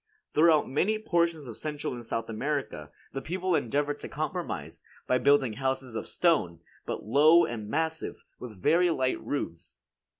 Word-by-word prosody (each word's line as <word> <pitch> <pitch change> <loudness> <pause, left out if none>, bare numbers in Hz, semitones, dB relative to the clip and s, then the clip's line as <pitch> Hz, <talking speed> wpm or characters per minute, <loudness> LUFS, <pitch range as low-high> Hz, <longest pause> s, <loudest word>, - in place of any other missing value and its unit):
Throughout 155 -1 +5
many 190 +11 +1
portions 170 -7 0
of 115 - -8
Central 150 -3 -4
and 120 -1 -7
South 115 0 -3
America, 115 - -3 0.2
the 135 - -3
people 185 +3 -2
endeavor 145 +4 0
to - - -9
compromise, - - -4 0.2
by 125 - +2
building 140 -5 +3
houses 130 0 -2
of - - -4
stone, 145 - +1 0.3
but - - -4
low 155 +9 +6
and 110 -3 -5
massive, 160 +4 -2 0.2
with 110 -6 -9
very 170 - +4
light 130 -5 0
roofs. 85 -13 -5
145 Hz, 155 wpm, -28 LUFS, 120-160 Hz, 0.3 s, low